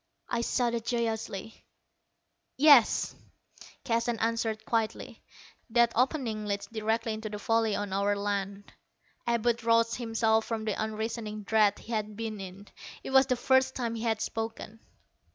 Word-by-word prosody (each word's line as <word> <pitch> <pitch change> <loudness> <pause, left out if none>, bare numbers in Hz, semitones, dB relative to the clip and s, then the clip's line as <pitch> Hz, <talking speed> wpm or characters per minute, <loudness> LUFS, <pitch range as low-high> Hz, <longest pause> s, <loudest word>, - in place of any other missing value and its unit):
I 235 - -1
shouted 235 -1 0
joyously. 225 -3 -3 0.9
"Yes," 280 -5 +6 0.7
Keston 230 0 0
answered 225 -1 -1
quietly. 225 -2 -2 0.5
"That 235 0 +4
opening 240 -5 0
leads 200 0 -2
directly 220 +1 -1
into 215 0 -5
the 210 - -5
valley 225 0 +1
on 205 -2 -3
our 200 +1 +1
land." 200 0 -3 0.5
Abud 235 0 +1
roused 230 0 +3
himself 225 -2 +1
from 225 -2 -3
the 215 - 0
unreasoning 220 -1 -4
dread 210 -1 +3
he 235 - -11
had 215 -2 -2
been 220 -1 -4
in. 190 +2 -9 0.4
It - - -6
was 265 0 +6
the 255 - +2
first 260 +1 +2
time 235 -3 -2
he 225 - -5
had 225 -2 0
spoken. 225 0 -5
225 Hz, 140 wpm, -29 LUFS, 215-235 Hz, 0.9 s, Yes